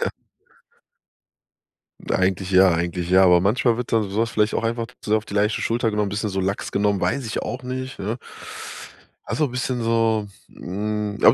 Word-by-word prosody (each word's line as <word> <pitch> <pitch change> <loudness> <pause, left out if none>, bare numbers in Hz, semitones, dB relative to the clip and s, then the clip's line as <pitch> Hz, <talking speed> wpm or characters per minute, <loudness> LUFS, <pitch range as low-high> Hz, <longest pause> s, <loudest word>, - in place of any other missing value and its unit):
Ja. - - 0 2.0
Eigentlich 95 0 +1
ja, 95 0 +6
eigentlich 85 +1 -2
ja, 95 +1 +7
aber 90 -2 +6
manchmal 115 +4 +2
wird 125 - -4
dann 110 -3 +2
so 100 - -4
was 115 0 -1
vielleicht 105 0 +1
auch - - -1
einfach 115 0 -1 0.2
so 105 - +3
auf 110 0 -1
die 100 - -7
leichte 105 +1 +1
Schulter 115 -1 0
genommen, 105 -1 0
bisschen 105 +2 -2
so 95 - -2
lax 95 +1 -2
genommen, 100 -1 +1
weiß 95 +9 0
ich 110 - -2
auch 125 - -4
nicht, 130 +1 -5
ne. 110 +5 -2 1.1
Also, 150 - 0
bisschen 125 -1 -2
so, 115 -2 +2 0.2
hm, 105 +2 -3
aber - - +9
105 Hz, 180 wpm, -23 LUFS, 95-115 Hz, 2.0 s, aber